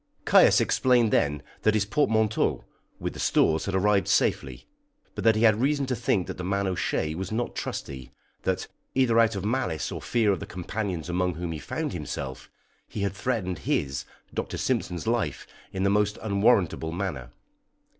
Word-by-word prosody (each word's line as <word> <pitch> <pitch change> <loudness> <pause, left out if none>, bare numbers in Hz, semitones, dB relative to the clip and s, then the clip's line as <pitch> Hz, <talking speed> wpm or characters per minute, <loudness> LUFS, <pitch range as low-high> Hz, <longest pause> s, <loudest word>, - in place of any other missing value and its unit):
Caius - - +6
explained 120 -4 +3
then 75 0 +1 0.2
that 110 0 +3
his 105 -2 +2
portmanteaus, 110 -3 +1 0.4
with - - -3
the - - -10
stores, 80 0 +2
had 100 - -2
arrived 100 +1 +2
safely; - - 0 0.5
but 100 - -5
that 110 0 +5
he 110 - +1
had 110 -1 +5
reason 140 +1 +1
to 130 -1 -1
think 95 -5 0
that - - -6
the 90 - -5
man 100 +2 0
O'Shea 90 -4 -1
was 95 +4 -5
not 120 +2 -2
trusty, 65 -2 -5 0.3
that, - - -1 0.3
either 120 -3 +4
out 115 -2 +4
of 95 0 -4
malice 115 - -1
or - - -5
fear 115 -4 +2
of 95 - -1
the - - -7
companions 90 -2 -4
among 90 0 0
whom 85 +1 -4
he 80 - -4
found - - -4
himself, 65 -2 -6 0.4
he 105 - -5
had 100 0 0
threatened 100 -5 -2
his, 70 -1 0 0.3
Dr. - - -3
Simpson's, 90 -2 -1
life 115 - -1 0.3
in 95 - -2
the 100 - +3
most 105 0 +1
unwarrantable 100 -6 +2
manner. 80 -9 -4
100 Hz, 175 wpm, -26 LUFS, 85-110 Hz, 0.5 s, Caius